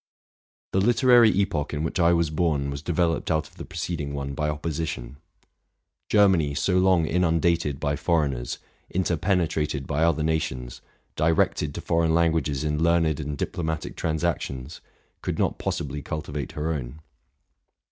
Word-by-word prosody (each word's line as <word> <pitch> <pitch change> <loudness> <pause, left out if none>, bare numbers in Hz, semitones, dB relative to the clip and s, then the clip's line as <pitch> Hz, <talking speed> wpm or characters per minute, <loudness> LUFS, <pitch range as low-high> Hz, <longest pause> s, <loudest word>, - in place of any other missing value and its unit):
The 95 - +2
literary 120 +1 +6
epoch 95 -8 0
in 75 - -2
which 80 +3 -2
I 85 0 +5
was 85 -2 +2
born 75 -4 0
was 70 0 -5
deyeloped 85 0 0
out 80 -1 +1
of - - -22
the - - -7
preceding 80 -4 -4
one 70 0 -4
by 75 +1 -1
opposition. 75 -4 -4 0.9
Germany, 95 -9 +4
so 90 +4 +2
long 90 -3 +4
inundated 85 -4 +1
by 70 0 0
foreigners, 70 -7 0 0.3
interpenetrated 80 -5 0
by 70 +4 0
other 85 -2 +2
nations, 65 -6 -2 0.3
directed 75 -2 +1
to - - -4
foreign 85 -1 +1
languages 80 -4 +1
in 75 0 -1
learned 80 -2 +2
and 75 -1 -4
diplomatic 80 +2 -3
trans 80 0 -2
actions, 75 -4 -3 0.4
could - - -3
not - - 0
possibly 75 0 -3
cultivate 75 0 -5
her 80 +2 -1
own. 65 0 -6
80 Hz, 145 wpm, -25 LUFS, 75-85 Hz, 0.9 s, literary